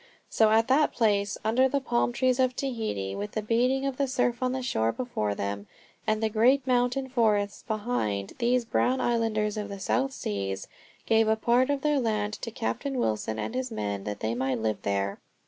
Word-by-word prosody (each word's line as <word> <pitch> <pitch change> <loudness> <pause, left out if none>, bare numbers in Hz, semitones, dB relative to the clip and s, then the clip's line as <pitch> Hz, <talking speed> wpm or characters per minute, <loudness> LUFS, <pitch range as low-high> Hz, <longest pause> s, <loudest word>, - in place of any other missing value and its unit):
So 220 -1 +4
at 225 +1 +4
that 285 +3 +3
place, 205 -3 +1
under 255 +4 +3
the 280 - +1
palm 240 -2 0
trees 255 +1 +1
of 255 -1 +2
Tahiti, 220 - -3
with 100 +1 -5
the 215 - -2
beating 250 +5 +1
of 270 -2 -2
the 280 - +1
surf 245 -1 0
on 255 0 +1
the 260 0 -3
shore 115 - +1
before 105 - -2
them, 100 +1 -4 0.4
and 215 +1 +1
the - - +3
great 250 +5 +3
mountain 250 +1 +1
forests 215 -5 +1
behind, 205 - -2
these 245 0 +2
brown 255 +2 +1
islanders 220 -3 0
of 205 -1 -4
the 200 -1 -6
South 265 +7 0
Seas 100 - -4 0.4
gave 225 0 +3
a 220 - +4
part 240 +4 +2
of 285 -1 0
their 295 -1 +2
land 215 -3 -1
to - - -4
Captain 230 - -3
Wilson 110 - -1
and 110 - -3
his 255 0 -2
men 100 - -3
that 105 -1 -5
they 110 +1 -1
might 130 +1 -1
live 110 -1 -2
there. 100 0 -1
225 Hz, 200 wpm, -27 LUFS, -, 0.4 s, So